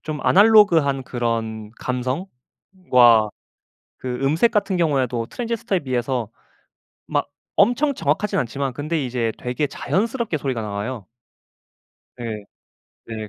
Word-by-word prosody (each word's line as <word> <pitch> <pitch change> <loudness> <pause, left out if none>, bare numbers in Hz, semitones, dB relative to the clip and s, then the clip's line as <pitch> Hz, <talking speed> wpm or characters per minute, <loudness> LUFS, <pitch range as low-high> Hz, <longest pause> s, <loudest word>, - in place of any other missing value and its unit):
좀 150 -2 -5
아날로그한 185 -10 +5
그런 115 -3 -3
감성과 125 - +1 0.7
그 125 -1 -4
음색 160 +12 +3
같은 200 -4 0
경우에도 130 -8 0
트랜지스터에 230 - -2
비해서 125 -4 -2 0.8
막 - - -1 0.3
엄청 260 +8 +3
정확하진 165 - 0
않지만 135 +2 -2
근데 150 +3 -2
이제 120 -3 -1
되게 125 +5 -1
자연스럽게 220 - -1
소리가 130 -5 -2
나와요. 105 +2 -4 1.2
예. 110 -3 -5 0.6
네. 110 -2 -6
135 Hz, 260 characters per minute, -22 LUFS, 120-185 Hz, 1.2 s, 아날로그한